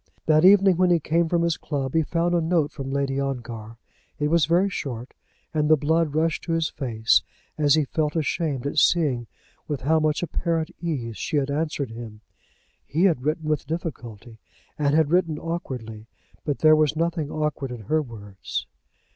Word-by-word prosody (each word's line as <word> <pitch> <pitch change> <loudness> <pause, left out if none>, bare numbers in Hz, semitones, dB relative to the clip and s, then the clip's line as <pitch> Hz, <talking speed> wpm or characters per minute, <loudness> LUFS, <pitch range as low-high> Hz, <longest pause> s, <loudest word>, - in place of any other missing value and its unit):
That 155 0 +4
evening, 195 -1 +6
when 180 0 +3
he 175 -1 +4
came 165 +2 +1
from 170 0 +1
his 170 -1 +1
club, 135 -3 -3
he 160 - +3
found 170 +2 0
a 175 - +2
note 160 -2 +1
from 135 -2 -6
Lady 135 0 -1
Ongar. 120 -5 -5 0.4
It 150 0 0
was 165 -3 +3
very 175 +4 +3
short, 130 - -5 0.4
and 150 -1 +1
the 155 - +6
blood 155 +1 +1
rushed 160 0 0
to 165 - -1
his 165 -1 +1
face 115 -4 +2 0.3
as 150 -2 +4
he 155 -2 +2
felt 150 +2 -1
ashamed 155 -4 -1
at 145 +2 +1
seeing 140 -9 +2 0.4
with 145 -3 -3
how 160 +4 +3
much 155 +1 0
apparent 165 -2 -1
ease 125 - -3
she 150 - -2
had 140 0 0
answered 145 -4 -2
him. 115 -2 -9 0.6
He 160 +5 -1
had 170 -10 +3
written 155 +3 -2
with 150 -2 -1
difficulty, 120 - -6 0.4
and 145 -1 +1
had 160 -1 +3
written 170 -3 +2
awkwardly. 125 -10 -6 0.4
But 145 -2 -1
there 155 0 +6
was 155 -1 +2
nothing 165 -2 -1
awkward 150 -4 -2
in 120 -2 -7
her 155 +10 +1
words. 100 - -6
150 Hz, 180 wpm, -24 LUFS, 135-165 Hz, 0.6 s, evening